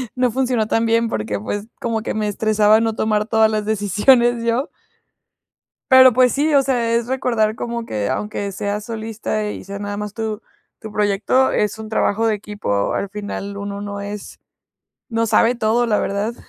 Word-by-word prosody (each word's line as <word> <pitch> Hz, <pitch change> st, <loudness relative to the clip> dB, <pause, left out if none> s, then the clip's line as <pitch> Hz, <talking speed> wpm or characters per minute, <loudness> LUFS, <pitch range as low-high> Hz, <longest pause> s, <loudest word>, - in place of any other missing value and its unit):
no 250 Hz, -1 st, +1 dB
funcionó 250 Hz, -3 st, 0 dB
tan 225 Hz, +1 st, +1 dB
bien 230 Hz, 0 st, +2 dB
porque, 105 Hz, -1 st, -2 dB
pues, 205 Hz, -, -4 dB
como 230 Hz, -2 st, -1 dB
que -, -, -3 dB
me 215 Hz, -1 st, -1 dB
estresaba 215 Hz, +1 st, +3 dB
no 225 Hz, -1 st, 0 dB
tomar 215 Hz, -1 st, 0 dB
todas 220 Hz, -1 st, +3 dB
las 215 Hz, -1 st, -1 dB
decisiones 220 Hz, +4 st, +3 dB
yo. 235 Hz, +5 st, 0 dB, 1.2 s
Pero, 260 Hz, -1 st, +8 dB
pues 250 Hz, +1 st, +4 dB
sí, 300 Hz, +2 st, +1 dB
o 280 Hz, -, +6 dB
sea, 240 Hz, -4 st, 0 dB
es 235 Hz, 0 st, 0 dB
recordar 235 Hz, -4 st, 0 dB
como 235 Hz, 0 st, -4 dB
que, 105 Hz, -2 st, -2 dB
aunque 200 Hz, -, -3 dB
sea 205 Hz, +1 st, -2 dB
solista 220 Hz, -1 st, -4 dB
y -, -, -7 dB
sea 200 Hz, +1 st, -6 dB
nada 205 Hz, 0 st, -5 dB
más 210 Hz, -1 st, -5 dB
tu 220 Hz, -1 st, -4 dB, 0.4 s
tu 220 Hz, -, -8 dB
proyecto, 210 Hz, +5 st, +1 dB
es 210 Hz, 0 st, 0 dB
un 220 Hz, -1 st, -7 dB
trabajo 220 Hz, 0 st, +1 dB
de 220 Hz, -, +2 dB
equipo, 205 Hz, -, -2 dB
al 200 Hz, -, -2 dB
final, 200 Hz, -1 st, -6 dB
uno 200 Hz, 0 st, -5 dB
no 205 Hz, 0 st, -5 dB
es 205 Hz, 0 st, -7 dB, 0.7 s
no 230 Hz, 0 st, 0 dB
sabe 230 Hz, +2 st, +3 dB
todo, 235 Hz, +1 st, +1 dB
la 210 Hz, -, +2 dB
verdad. 205 Hz, +4 st, -2 dB
220 Hz, 180 wpm, -20 LUFS, 205-235 Hz, 1.2 s, Pero